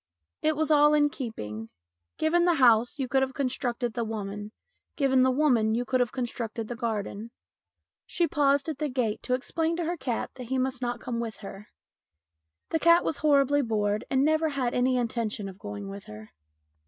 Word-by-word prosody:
It 310 Hz, 0 st, +2 dB
was 315 Hz, +1 st, 0 dB
all 295 Hz, 0 st, +6 dB
in 290 Hz, -1 st, +4 dB
keeping. 110 Hz, -, -6 dB, 0.5 s
Given 345 Hz, +2 st, +2 dB
the 350 Hz, -1 st, +3 dB
house, 245 Hz, -2 st, +4 dB
you 265 Hz, -2 st, -2 dB
could 265 Hz, +1 st, +2 dB
have 265 Hz, 0 st, -1 dB
constructed 245 Hz, -3 st, -2 dB
the 235 Hz, -, -2 dB
woman; 210 Hz, -1 st, -5 dB, 0.4 s
given 265 Hz, -3 st, +3 dB
the 260 Hz, -, +4 dB
woman, 250 Hz, -6 st, +2 dB
you 245 Hz, +1 st, -1 dB
could 255 Hz, +2 st, +1 dB
have 245 Hz, -2 st, +1 dB
con 255 Hz, -2 st, -2 dB
structed 230 Hz, -1 st, -5 dB
the 240 Hz, -, -5 dB
garden. 220 Hz, -1 st, -3 dB, 0.8 s
She 345 Hz, -, +1 dB
paused 280 Hz, -2 st, +2 dB
at 305 Hz, -3 st, -4 dB
the 300 Hz, -, -1 dB
gate 245 Hz, -5 st, -1 dB
to 250 Hz, -, 0 dB
explain 325 Hz, +5 st, -1 dB
to 340 Hz, -1 st, -2 dB
her 345 Hz, +2 st, -2 dB
cat 260 Hz, -5 st, -3 dB
that 250 Hz, -, -7 dB
he 265 Hz, +2 st, -1 dB
must 260 Hz, 0 st, -1 dB
not 240 Hz, -1 st, -3 dB
come 240 Hz, -2 st, -3 dB
with 230 Hz, -2 st, -4 dB
her. 195 Hz, +2 st, -9 dB, 1.0 s
The 320 Hz, -, +1 dB
cat 335 Hz, +2 st, +5 dB
was 310 Hz, -, 0 dB
horribly 285 Hz, -1 st, +3 dB
bored 210 Hz, -4 st, 0 dB
and 265 Hz, +1 st, +2 dB
never 315 Hz, +1 st, +2 dB
had 260 Hz, -4 st, -1 dB
any 255 Hz, +1 st, +2 dB
intention 230 Hz, -4 st, -2 dB
of 190 Hz, 0 st, -10 dB
going 205 Hz, -1 st, -7 dB
with 195 Hz, 0 st, -8 dB
her. 105 Hz, 0 st, -11 dB
250 Hz, 195 wpm, -27 LUFS, 220-285 Hz, 1.0 s, all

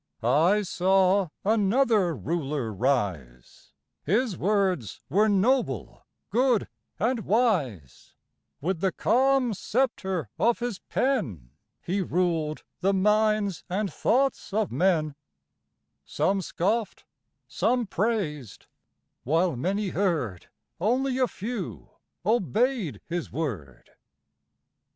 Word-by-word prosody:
I 165 Hz, -, +3 dB
saw 190 Hz, +1 st, +2 dB, 0.2 s
another 210 Hz, -, +3 dB
Ruler 145 Hz, -6 st, -2 dB
rise 95 Hz, -, -2 dB, 0.3 s
His 215 Hz, -, +1 dB
words 185 Hz, -, 0 dB
were 210 Hz, +8 st, +3 dB
noble, 235 Hz, +7 st, 0 dB, 0.2 s
good, 245 Hz, -3 st, +2 dB, 0.3 s
and 235 Hz, +4 st, 0 dB
wise; 175 Hz, -, -1 dB, 0.5 s
With 175 Hz, +3 st, -1 dB
the 190 Hz, -1 st, +2 dB
calm 260 Hz, -1 st, +2 dB
sceptre 190 Hz, -, -1 dB
of 235 Hz, 0 st, +3 dB
his 240 Hz, -5 st, -4 dB
pen 120 Hz, -, -2 dB, 0.3 s
He 195 Hz, +3 st, -1 dB
ruled 165 Hz, -4 st, -1 dB, 0.2 s
the 195 Hz, +2 st, +2 dB
minds 210 Hz, -1 st, +2 dB
and 195 Hz, +2 st, -2 dB
thoughts 270 Hz, -1 st, +1 dB
of 215 Hz, -1 st, 0 dB
men; 165 Hz, -5 st, +1 dB, 0.9 s
Some 195 Hz, 0 st, 0 dB
scoffed, 205 Hz, +6 st, -2 dB, 0.4 s
some 245 Hz, +1 st, +1 dB
praised 190 Hz, -, -2 dB, 0.6 s
while 165 Hz, +4 st, +1 dB
many 195 Hz, -, -1 dB
heard, 160 Hz, -, -1 dB, 0.3 s
Only 255 Hz, +7 st, +1 dB
a 255 Hz, -, +3 dB
few 190 Hz, -, -6 dB, 0.4 s
obeyed 220 Hz, -, +1 dB
his 170 Hz, -1 st, -4 dB
word. 100 Hz, -, -5 dB
190 Hz, 95 wpm, -26 LUFS, 155-220 Hz, 0.9 s, I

